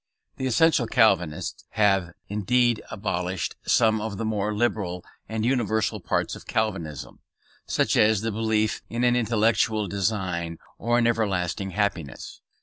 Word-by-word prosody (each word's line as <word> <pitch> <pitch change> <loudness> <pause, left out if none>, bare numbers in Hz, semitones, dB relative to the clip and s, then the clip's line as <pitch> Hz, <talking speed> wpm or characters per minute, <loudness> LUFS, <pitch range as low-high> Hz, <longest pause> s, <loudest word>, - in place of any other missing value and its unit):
These 130 -2 -1
essential 160 -4 +4
Calvinists 90 -6 +1
have, 95 -5 +2
indeed, 120 +3 +1
abolished 90 -2 -3
some 110 -1 +3
of 110 -2 -4
the 115 - -3
more 105 -1 -1
liberal 105 -5 -1 0.2
and 110 0 -2
universal 115 -4 0
parts - - -1
of - - -13
Calvinism, 90 -10 -3 0.5
such - - +1
as 105 -1 +4
the 115 0 -1
belief 110 0 0
in 120 +2 -2
an 120 0 +4
intellectual 110 -2 +2
design 95 -4 -2 0.2
or 120 +2 +1
an 120 - +3
everlasting 100 -5 0
happiness. 95 -6 -3
105 Hz, 135 wpm, -25 LUFS, 95-115 Hz, 0.5 s, essential